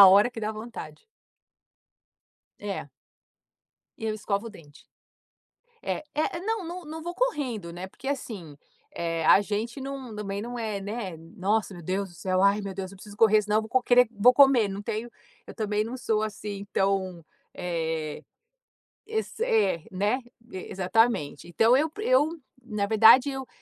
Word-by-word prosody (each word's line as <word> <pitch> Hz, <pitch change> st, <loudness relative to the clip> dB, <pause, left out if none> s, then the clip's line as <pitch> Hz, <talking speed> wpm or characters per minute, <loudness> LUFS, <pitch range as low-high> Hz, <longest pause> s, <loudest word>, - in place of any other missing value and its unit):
na -, -, +10 dB
hora 205 Hz, +6 st, +6 dB
que 235 Hz, -, -9 dB
dá 215 Hz, +1 st, -2 dB
vontade. 230 Hz, -, -9 dB, 1.6 s
É. -, -, -4 dB, 1.1 s
Eu 220 Hz, -1 st, -2 dB
escovo 210 Hz, +1 st, -2 dB
o -, -, -7 dB
dente. 150 Hz, -8 st, -16 dB, 1.0 s
É -, -, -1 dB
é 310 Hz, +3 st, 0 dB
não 425 Hz, 0 st, -2 dB
não 345 Hz, 0 st, -7 dB
não 320 Hz, +1 st, -7 dB
vou 345 Hz, -, -4 dB
correndo 260 Hz, -, -2 dB
né, 180 Hz, +2 st, -6 dB
porque 255 Hz, +7 st, -11 dB
assim, 200 Hz, -, -5 dB, 0.4 s
eh, 165 Hz, -1 st, -2 dB
a 195 Hz, -, +7 dB
gente 220 Hz, +5 st, -3 dB
não 265 Hz, -4 st, -6 dB
também 200 Hz, -1 st, -4 dB
não 240 Hz, +2 st, -5 dB
é 215 Hz, -3 st, -2 dB
né: 195 Hz, -4 st, -5 dB, 0.2 s
"Nossa, 205 Hz, +1 st, 0 dB
meu 175 Hz, -2 st, -10 dB
Deus 190 Hz, +3 st, -1 dB
do 175 Hz, -, -16 dB
céu, 185 Hz, +1 st, 0 dB
ai 200 Hz, +2 st, +4 dB
meu 200 Hz, -1 st, -5 dB
Deus, 190 Hz, 0 st, -5 dB
eu -, -, -12 dB
preciso 205 Hz, +1 st, -12 dB
correr 215 Hz, -1 st, +6 dB
senão 210 Hz, +1 st, +1 dB
vou 245 Hz, +3 st, 0 dB
querer 245 Hz, 0 st, +5 dB
vou 240 Hz, +5 st, +7 dB
comer", 265 Hz, -7 st, +6 dB
não 195 Hz, +1 st, -5 dB
tenho 220 Hz, +3 st, -4 dB, 0.3 s
eu -, -, -10 dB
também 210 Hz, -1 st, 0 dB
não 240 Hz, +4 st, -5 dB
sou 220 Hz, -3 st, 0 dB
assim 205 Hz, -2 st, -5 dB
tão 190 Hz, -3 st, 0 dB, 0.3 s
eh, 160 Hz, -3 st, -3 dB, 0.8 s
esse 440 Hz, +1 st, -4 dB
é 195 Hz, -, +2 dB
né, 205 Hz, +7 st, 0 dB, 0.3 s
e 185 Hz, -, -6 dB
exatamente. 190 Hz, -6 st, +1 dB
Então 225 Hz, +8 st, +4 dB
eu 310 Hz, +3 st, +1 dB
eu 385 Hz, -9 st, +3 dB, 0.2 s
na 210 Hz, -4 st, -2 dB
verdade 225 Hz, +5 st, +7 dB
eu 265 Hz, -1 st, -5 dB
215 Hz, 165 wpm, -27 LUFS, 195-250 Hz, 1.6 s, na